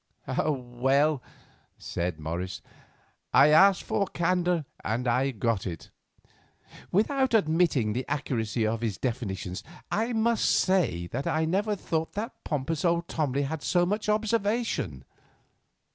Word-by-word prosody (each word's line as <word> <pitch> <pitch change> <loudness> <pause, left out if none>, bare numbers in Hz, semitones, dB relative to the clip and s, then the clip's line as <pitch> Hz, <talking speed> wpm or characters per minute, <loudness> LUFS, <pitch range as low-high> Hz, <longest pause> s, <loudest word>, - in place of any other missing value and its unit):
"Well," 135 +2 +1 0.6
said 85 -2 -3
Morris, 85 +4 -4 0.7
"I 150 - +8
asked 190 +5 +6
for 200 - 0
candour 175 -2 0 0.2
and 120 +4 -1
I 125 +3 +2
have 125 -6 -6
got 110 -3 0
it. 85 -3 -7 1.0
Without 260 +5 +2
admitting 160 - +2
the 125 +3 -2
accuracy 120 -6 -1
of 110 +1 -1
his 110 -5 -2
definitions, 100 -7 -3 0.3
I 230 +3 0
must 230 0 +2
say 160 - +2
that 120 +10 -4
I 160 0 +1
never 205 +6 0
thought 160 -4 -2
that 225 +5 -5
pompous 150 +1 -2
old 170 -1 +1
Tomley 145 -3 -1
had 150 +2 -3
so 175 +4 +2
much 210 +3 -1
observation." 210 - 0
150 Hz, 130 wpm, -27 LUFS, 115-190 Hz, 1.0 s, I